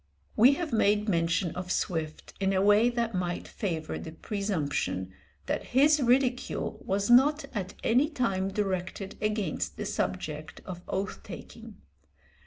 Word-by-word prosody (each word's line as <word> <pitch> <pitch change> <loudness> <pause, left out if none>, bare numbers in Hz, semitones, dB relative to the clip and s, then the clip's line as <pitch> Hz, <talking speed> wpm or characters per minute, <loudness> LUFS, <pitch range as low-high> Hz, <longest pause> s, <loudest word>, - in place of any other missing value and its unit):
We 245 +6 +7
have 310 -1 -3
made 210 -1 +3
mention 170 -1 +1
of 180 0 -5
Swift 160 -5 -2
in 195 0 +1
a 190 - +2
way 210 +4 +5
that 235 -2 -1
might 180 -1 -2
favour 165 -7 -3
the 160 - -8
presumption 155 - -2 0.3
that - - -1
his 295 +2 +6
ridicule 250 0 +1
was 200 +3 0
not 290 +5 +5
at 195 -4 -4
any 260 +6 +3
time 195 - 0
directed 195 -1 -3
against 215 -1 -1
the 210 - -3
subject 160 -6 -3
of 180 -2 -7
oath 195 +1 -3
taking. - - -10
200 Hz, 140 wpm, -29 LUFS, 180-235 Hz, 0.3 s, We